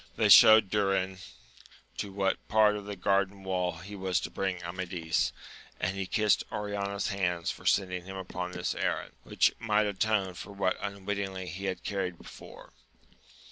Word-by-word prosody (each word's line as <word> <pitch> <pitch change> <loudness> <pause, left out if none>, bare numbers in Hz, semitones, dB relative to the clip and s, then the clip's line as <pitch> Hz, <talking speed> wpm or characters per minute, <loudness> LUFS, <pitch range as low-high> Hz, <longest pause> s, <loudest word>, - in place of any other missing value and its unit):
They - - +2
showed 110 -3 +9
Durin 95 -2 0 0.8
to 100 - -4
what 95 0 -1
part 110 -1 +4
of 105 -1 -6
the 105 0 -5
garden 95 +1 0
wall 90 -2 -1
he 95 +5 -9
was 95 -2 0
to - - -5
bring 95 -2 -2
Amadis, 85 -2 -2 0.5
and 95 +2 -1
he 95 -1 -3
kissed 105 +1 +2
Oriana's 100 -1 -2
hands 90 -4 -1
for - - -8
sending 90 -2 +1
him 95 0 -8
upon 90 -1 -5
this 90 0 -2
errand, - - -2
which - - +2
might 105 -2 +2
atone 100 -1 0
for 100 +3 -9
what 100 -2 0
unwittingly 100 -1 -4
he 95 +4 -6
had 95 -1 -3
carried 95 -3 -3
before. - - -13
95 Hz, 160 wpm, -29 LUFS, 90-100 Hz, 0.8 s, showed